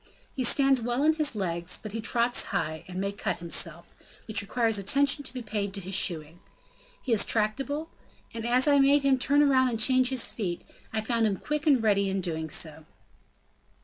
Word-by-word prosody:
He 260 Hz, -, -3 dB
stands 270 Hz, +1 st, +3 dB
well 240 Hz, +4 st, -1 dB
on 315 Hz, +1 st, +4 dB
his 305 Hz, -5 st, 0 dB
legs, 175 Hz, -3 st, -2 dB
but 215 Hz, -, -9 dB
he 225 Hz, +2 st, -5 dB
trots 235 Hz, +2 st, +1 dB
high, 155 Hz, 0 st, -3 dB
and 185 Hz, 0 st, -6 dB
may 200 Hz, +1 st, -2 dB
cut 200 Hz, -, -4 dB
himself, 170 Hz, -1 st, -2 dB, 0.3 s
which 215 Hz, -1 st, -1 dB
requires 225 Hz, +1 st, 0 dB
attention 280 Hz, +8 st, +2 dB
to -, -, -5 dB
be 255 Hz, -2 st, -7 dB
paid 205 Hz, -2 st, -4 dB
to -, -, -4 dB
his 190 Hz, +1 st, -6 dB
shoeing. 165 Hz, -3 st, +1 dB, 0.6 s
He 250 Hz, -, 0 dB
is 215 Hz, -, +2 dB
tractable; 275 Hz, +9 st, -1 dB, 0.4 s
and 230 Hz, -1 st, -6 dB
as 250 Hz, +4 st, +2 dB
I 285 Hz, -1 st, +4 dB
made 280 Hz, +1 st, +4 dB
him 270 Hz, -1 st, +2 dB
turn 285 Hz, +3 st, +3 dB
round 260 Hz, -2 st, +3 dB
and 225 Hz, -2 st, -3 dB
change 255 Hz, +2 st, +4 dB
his 260 Hz, -3 st, 0 dB
feet, 180 Hz, -6 st, -4 dB, 0.3 s
I 220 Hz, -, -2 dB
found 230 Hz, 0 st, 0 dB
him 200 Hz, -2 st, -2 dB
quick 300 Hz, -, -4 dB
and 265 Hz, -6 st, +3 dB
ready 200 Hz, -2 st, +2 dB
in 195 Hz, 0 st, -2 dB
doing 160 Hz, -3 st, -4 dB
so." 155 Hz, +1 st, -3 dB
225 Hz, 200 wpm, -27 LUFS, 195-265 Hz, 0.6 s, on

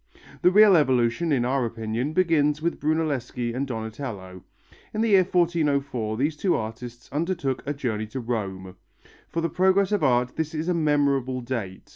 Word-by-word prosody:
The -, -, +6 dB
real 205 Hz, 0 st, +7 dB
evolution, 130 Hz, +1 st, +2 dB
in 125 Hz, -4 st, +2 dB
our 130 Hz, +1 st, +1 dB
opinion, 115 Hz, +4 st, -3 dB
begins 155 Hz, -5 st, +2 dB
with 170 Hz, +2 st, -2 dB
Brunelleschi 145 Hz, -6 st, -1 dB
and 135 Hz, +3 st, -2 dB
Donatello. 110 Hz, -6 st, -6 dB, 0.5 s
In 215 Hz, -, 0 dB
the 230 Hz, -, +2 dB
year 195 Hz, -3 st, +6 dB
1404 145 Hz, -, 0 dB
these 145 Hz, +5 st, 0 dB
two 180 Hz, +4 st, +1 dB
artists 115 Hz, +2 st, -6 dB
undertook 150 Hz, -3 st, -2 dB
a 145 Hz, -, 0 dB
journey 110 Hz, -6 st, -3 dB
to 130 Hz, +5 st, -6 dB
Rome. 95 Hz, -6 st, -4 dB, 0.5 s
For 165 Hz, -, -2 dB
the 165 Hz, -, +1 dB
progress 190 Hz, +2 st, +2 dB
of 205 Hz, -6 st, +1 dB
art 125 Hz, -2 st, +1 dB
this 160 Hz, 0 st, -2 dB
is 155 Hz, +2 st, -3 dB
a 180 Hz, -, +2 dB
memorable 140 Hz, -5 st, +1 dB
date. 115 Hz, -7 st, -5 dB
140 Hz, 165 wpm, -25 LUFS, 120-165 Hz, 0.5 s, real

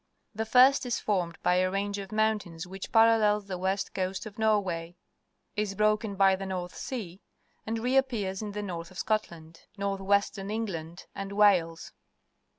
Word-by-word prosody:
The 220 Hz, +1 st, -3 dB
first 260 Hz, +5 st, +6 dB
is 240 Hz, -, -1 dB
formed 180 Hz, -5 st, -1 dB
by 180 Hz, -, +3 dB
a 185 Hz, 0 st, +2 dB
range 200 Hz, +1 st, -2 dB
of 195 Hz, -1 st, -7 dB
tains 215 Hz, -6 st, -1 dB
which 190 Hz, +1 st, -8 dB
parallels 220 Hz, -2 st, +4 dB
the 185 Hz, -2 st, -5 dB
west 190 Hz, +2 st, -1 dB
moun 185 Hz, -1 st, +1 dB
coast 190 Hz, +4 st, -6 dB
of 215 Hz, 0 st, -10 dB
Norway, 185 Hz, -6 st, 0 dB, 0.6 s
is 210 Hz, -2 st, -1 dB
broken 215 Hz, 0 st, +1 dB
by 195 Hz, 0 st, +5 dB
the 195 Hz, 0 st, -6 dB
North 180 Hz, -1 st, -4 dB
Sea, 200 Hz, -8 st, -6 dB, 0.5 s
and 225 Hz, +1 st, -1 dB
reappears 235 Hz, -6 st, 0 dB
in 210 Hz, -1 st, -5 dB
the 210 Hz, 0 st, -4 dB
north 170 Hz, -4 st, -5 dB
of 185 Hz, -, -14 dB
Scotland, 170 Hz, -7 st, -3 dB, 0.2 s
north 200 Hz, -1 st, -2 dB
western 200 Hz, 0 st, +1 dB
England, 180 Hz, -6 st, -4 dB
and 195 Hz, 0 st, -6 dB
Wales. 180 Hz, -6 st, +3 dB
200 Hz, 165 wpm, -28 LUFS, 185-215 Hz, 0.6 s, first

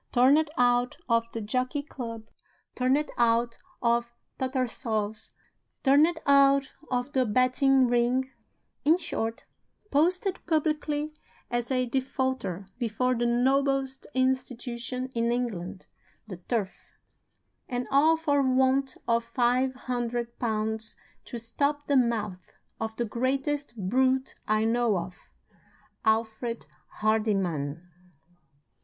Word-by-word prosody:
Turned 280 Hz, +5 st, +4 dB
out 245 Hz, -1 st, +2 dB
of 230 Hz, 0 st, +1 dB
the 225 Hz, -, -4 dB
Jockey 255 Hz, +6 st, -1 dB
Club, 230 Hz, -6 st, -7 dB, 0.5 s
turned 265 Hz, +4 st, +1 dB
out 235 Hz, 0 st, +2 dB, 0.2 s
of 235 Hz, 0 st, +2 dB, 0.3 s
Tattersalls', 235 Hz, -5 st, -2 dB, 0.5 s
turned 300 Hz, +5 st, +4 dB
out 275 Hz, -1 st, +5 dB, 0.2 s
of 250 Hz, +3 st, -2 dB
the 260 Hz, -, +3 dB
betting 255 Hz, +3 st, +3 dB
ring; 245 Hz, +2 st, +1 dB, 0.5 s
in 315 Hz, +4 st, +5 dB
short, 230 Hz, -10 st, -4 dB, 0.5 s
posted 365 Hz, +6 st, +1 dB
publicly 305 Hz, -1 st, 0 dB, 0.4 s
as 240 Hz, -1 st, -1 dB
a 255 Hz, -1 st, +1 dB
defaulter 260 Hz, -6 st, -2 dB
before 250 Hz, +2 st, 0 dB
the 240 Hz, 0 st, 0 dB
noblest 270 Hz, +2 st, +1 dB
institution 255 Hz, -1 st, -1 dB
in 235 Hz, 0 st, +1 dB
England, 200 Hz, -7 st, -3 dB, 0.4 s
the 190 Hz, -4 st, -7 dB
Turf 195 Hz, +2 st, -4 dB, 0.8 s
and 245 Hz, 0 st, -2 dB
all 310 Hz, +4 st, +5 dB
for 290 Hz, -3 st, +2 dB
want 265 Hz, +1 st, +2 dB
of 230 Hz, 0 st, +2 dB
five 255 Hz, +2 st, +1 dB
hundred 240 Hz, -1 st, -2 dB
pounds 220 Hz, -1 st, -2 dB, 0.3 s
to 240 Hz, -, -6 dB
stop 285 Hz, +6 st, -1 dB
the 285 Hz, -, +1 dB
mouth 220 Hz, -7 st, 0 dB, 0.3 s
of 220 Hz, 0 st, -3 dB
the 240 Hz, -, -1 dB
greatest 270 Hz, +3 st, -1 dB
brute 260 Hz, +7 st, +1 dB
I 215 Hz, 0 st, +2 dB
know 230 Hz, -2 st, +2 dB
of, 180 Hz, +1 st, -5 dB, 0.9 s
Alfred 225 Hz, +1 st, 0 dB, 0.4 s
Hardyman! 185 Hz, -8 st, 0 dB
245 Hz, 110 wpm, -28 LUFS, 230-270 Hz, 0.9 s, out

